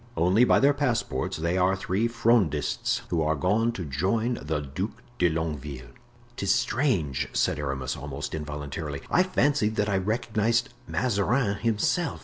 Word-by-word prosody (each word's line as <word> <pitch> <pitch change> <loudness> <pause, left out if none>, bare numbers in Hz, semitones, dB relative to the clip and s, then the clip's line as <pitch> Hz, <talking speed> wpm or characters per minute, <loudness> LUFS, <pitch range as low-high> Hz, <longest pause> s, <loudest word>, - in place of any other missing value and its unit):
"Only 95 +8 +4
by - - +4
their 140 +2 +5
passports; 120 - -1
they 85 +3 0
are 95 +1 +3
three 95 +4 0
Frondists, 115 -10 +1
who 85 -2 +1
are 80 0 +1
gone 105 +10 +1
to 95 - -5
rejoin 100 - 0
the 75 +1 -2
Duc 75 +9 -4 0.3
de 90 - +4
Longueville." 75 -6 -4 0.4
"'Tis 100 -3 +1
strange," 120 - 0
said - - +1
Aramis, 70 -3 -2
almost 75 0 -6
involuntarily; 75 -1 -5
"I 180 - +5
fancied 145 - +1
that 105 0 +1
I 100 - +2
recognized 115 +4 0 0.2
Mazarin 105 -1 +1
himself." 115 - 0
95 Hz, 145 wpm, -26 LUFS, 75-115 Hz, 0.4 s, their